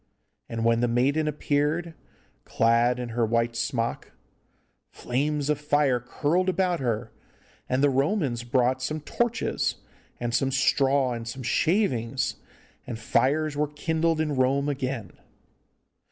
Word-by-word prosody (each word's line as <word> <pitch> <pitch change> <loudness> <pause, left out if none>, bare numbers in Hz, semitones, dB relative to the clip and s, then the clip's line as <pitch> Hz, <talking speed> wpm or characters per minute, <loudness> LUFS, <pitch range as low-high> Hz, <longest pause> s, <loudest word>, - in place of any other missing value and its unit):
And 115 0 -2
when 115 0 +3
the 120 - +2
maiden 135 +6 +1
appeared, 150 +3 0 0.5
clad 115 +2 +2
in 125 -1 -4
her 115 +1 0
white 115 +1 +1
smock, 115 -1 -2 0.8
flames 145 +3 -2
of 150 -1 0
fire 145 -4 +2
curled 155 +9 0
about 180 -1 +1
her, 120 -3 -2 0.6
and 130 +2 +1
the 145 - +5
Romans 135 - 0
brought 125 +1 +1
some 155 +4 -3
torches, 240 +9 -1 0.4
and 120 -1 -2
some 135 +2 +2
straw, 135 -1 +2
and 115 -1 -6
some 130 +3 -6
shavings, 130 - 0 0.5
and 120 - -4
fires 145 +6 +1
were 150 +1 +1
kindled 160 +2 0
in 150 -2 0
Rome 135 +2 +2
again. 130 -7 -3
135 Hz, 130 wpm, -26 LUFS, 120-150 Hz, 0.8 s, the